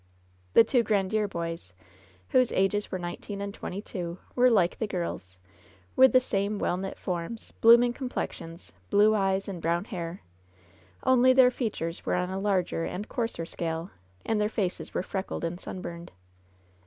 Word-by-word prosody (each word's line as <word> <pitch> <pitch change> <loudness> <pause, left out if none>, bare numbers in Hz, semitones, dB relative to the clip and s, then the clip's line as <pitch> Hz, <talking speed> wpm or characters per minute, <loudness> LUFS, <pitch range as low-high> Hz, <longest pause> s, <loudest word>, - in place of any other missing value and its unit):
The - - +8
two 240 +1 +2
Grandiere 210 0 +1
boys, 165 - -5 0.6
whose 255 -2 +3
ages 195 +2 +1
were 185 - -1
nineteen 180 +3 -6
and 200 0 -4
twenty 200 +1 -6
two, 175 -5 -5 0.2
were 250 0 +5
like 190 -7 +2
the 220 - -1
girls, 170 - -4 0.6
with 260 0 +7
the 255 - +6
same 205 -4 -1
well 175 - 0
knit 190 +1 -5
forms, 180 +5 -5
blooming 235 +1 +7
complexions, 190 -10 -6 0.2
blue 210 +2 +5
eyes 195 -2 +1
and 185 -4 -5
brown 170 +3 0
hair 175 -5 -6 0.4
— 85 0 -29 0.3
only 255 0 +5
their 255 -1 +6
features 200 -9 -3
were - - 0
on 180 +1 -1
a 190 - -2
larger 190 -4 0
and 200 +5 -5
coarser 230 -8 -2
scale, 165 +1 -4 0.3
and 220 -2 +1
their 210 - +1
faces 195 -5 -3
were - - 0
freckled 190 -2 -4
and 170 +1 -3
sunburned. 170 -2 -7
195 Hz, 165 wpm, -28 LUFS, 175-220 Hz, 0.6 s, The